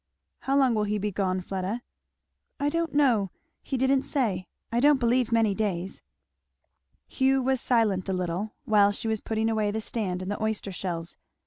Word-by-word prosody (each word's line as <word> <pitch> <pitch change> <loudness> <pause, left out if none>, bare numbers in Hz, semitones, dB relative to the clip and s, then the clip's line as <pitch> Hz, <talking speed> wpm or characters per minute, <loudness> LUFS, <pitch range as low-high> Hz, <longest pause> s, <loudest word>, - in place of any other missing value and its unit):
"How 275 +1 0
long 265 -3 +4
will 210 -1 +1
he 210 +1 0
be 205 +1 -2
gone, 185 -1 -1
Fleda?" 195 +6 -3 0.8
"I 285 - +1
don't 330 0 -2
know 240 -9 +3 0.3
he 265 - -3
didn't 265 +1 +3
say. 215 -12 -1 0.2
I 235 - +1
don't 290 +1 +5
believe 240 0 +2
many 225 -3 +3
days." 195 -3 -2 1.1
Hugh 265 0 +2
was 265 -1 +1
silent 210 -6 +1
a - - +1
little 185 +3 -3
while 205 -2 +5
she 205 - -4
was 220 -1 0
putting 220 0 -1
away 215 -2 +1
the 215 +2 -2
stand 195 -5 -3
and 190 - -4
the 205 - -4
oyster 220 -2 -2
shells. 175 -3 -4
220 Hz, 180 wpm, -27 LUFS, 195-255 Hz, 1.1 s, don't